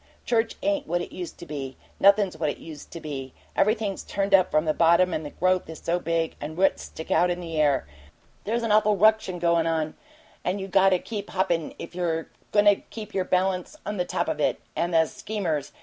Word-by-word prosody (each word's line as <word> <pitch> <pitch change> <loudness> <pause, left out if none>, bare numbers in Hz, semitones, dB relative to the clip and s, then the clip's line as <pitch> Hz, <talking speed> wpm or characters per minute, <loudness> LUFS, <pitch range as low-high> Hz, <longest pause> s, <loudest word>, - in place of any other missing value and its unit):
Church 225 -1 +1
ain't 295 -1 0
what 175 0 0
it - - -9
used 175 -3 -7
to - - -9
be. 140 -4 -6 0.2
Nothin's 200 -2 +5
what 160 -1 -1
it - - -4
used 155 -3 -10
to 170 - -8
be 135 -4 -6 0.2
everything's 215 -1 +1
turned 195 0 -2
up 185 -1 +6
from 155 +1 +2
the 155 - +2
bottom, 170 +2 +4
and 155 - -2
the 145 - -5
growth 185 +2 0
is 160 - -7
so 175 +1 -1
big 165 -1 -1
the 150 - -4
roots 185 +5 +1
stick 160 - -8
out 175 +2 +4
in 175 0 -1
the 165 -3 -2
air. 140 -3 +2 0.6
There's 230 +3 -1
an 225 - 0
awful 210 -1 +4
ruction 215 -2 +3
goin' 170 -1 +2
on, 160 -1 0 0.5
and 185 +3 -1
you 195 - -4
got 195 0 +5
to 185 - +3
keep 205 +2 -6
hoppin' 175 -4 -1
if - - -8
you're 165 -2 -2 0.2
goin' 205 0 +4
to 205 -1 +6
keep 215 -1 -10
your 185 -1 0
balance 185 - 0
on 210 0 -3
the 180 - +1
top - - -1
of - - -2
it. - - +1 0.2
And 175 +1 0
the 165 -1 +4
schemers! 165 -6 -3
180 Hz, 225 wpm, -26 LUFS, 160-200 Hz, 0.6 s, up